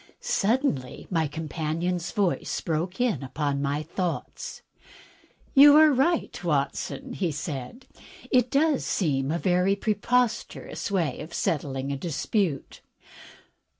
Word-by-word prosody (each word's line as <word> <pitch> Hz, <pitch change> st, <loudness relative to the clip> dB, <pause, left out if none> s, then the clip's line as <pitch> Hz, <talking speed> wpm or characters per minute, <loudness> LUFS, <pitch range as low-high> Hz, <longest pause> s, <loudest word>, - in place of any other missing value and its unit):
Suddenly 205 Hz, -, 0 dB
my 165 Hz, -3 st, +1 dB
companion's 165 Hz, +3 st, -3 dB
voice 195 Hz, -3 st, 0 dB
broke 170 Hz, +5 st, -2 dB
in 245 Hz, -8 st, +1 dB
upon 140 Hz, +1 st, -2 dB
my 145 Hz, +2 st, -1 dB
thoughts. 185 Hz, -, -4 dB, 0.9 s
"You 285 Hz, +1 st, +9 dB
are 310 Hz, -1 st, +7 dB
right, 285 Hz, -, 0 dB
Watson,'* 170 Hz, -, -2 dB, 0.2 s
said 150 Hz, -, -6 dB
he. -, -, -21 dB, 0.3 s
"It 250 Hz, 0 st, +4 dB
does 290 Hz, +1 st, +2 dB
seem 135 Hz, -7 st, 0 dB
a 165 Hz, -, 0 dB
very 180 Hz, +2 st, +2 dB
pre 215 Hz, +2 st, 0 dB
posterous 235 Hz, +2 st, -1 dB
way 170 Hz, -9 st, 0 dB
of 160 Hz, +3 st, -8 dB
settling 135 Hz, -3 st, -1 dB
a 140 Hz, -, -2 dB
dispute." 165 Hz, -, -2 dB
175 Hz, 115 wpm, -26 LUFS, 150-235 Hz, 0.9 s, You